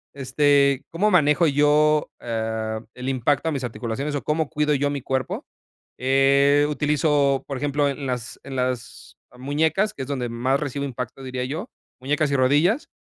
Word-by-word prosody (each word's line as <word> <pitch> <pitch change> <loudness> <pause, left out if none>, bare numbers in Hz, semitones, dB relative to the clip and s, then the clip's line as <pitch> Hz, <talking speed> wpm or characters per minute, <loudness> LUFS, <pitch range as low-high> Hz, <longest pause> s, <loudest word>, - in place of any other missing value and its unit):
Este, 140 0 +2
¿cómo 190 +6 +1
manejo 160 -2 +4
yo, 150 +1 +3
eh, 110 -1 -3
el 125 +1 -5
impacto 135 +4 +1
a - - -1
mis 140 -3 -3
articulaciones 120 +5 -4
o 145 - -2
cómo 155 0 0
cuido 150 -1 +1
yo 145 0 +1
a - - 0
mi 140 -1 -3
cuerpo?, 130 +1 -3 0.5
eh, 140 +2 +4
utilizo, 145 -2 +1
por 135 - -4
ejemplo, 145 +1 0
en 140 0 -5
las 125 -2 -4
en 135 - -7
las 115 - -4 0.2
muñecas, 160 +10 0
que - - -8
es - - -8
donde 130 -4 -3
más 125 +4 0
recibo 140 -1 -3
impacto 130 0 -6
diría 130 -1 -4
yo, 160 - -5 0.3
muñecas 145 +3 0
y - - +1
rodillas, 145 - +2
140 Hz, 170 wpm, -23 LUFS, 130-150 Hz, 0.5 s, manejo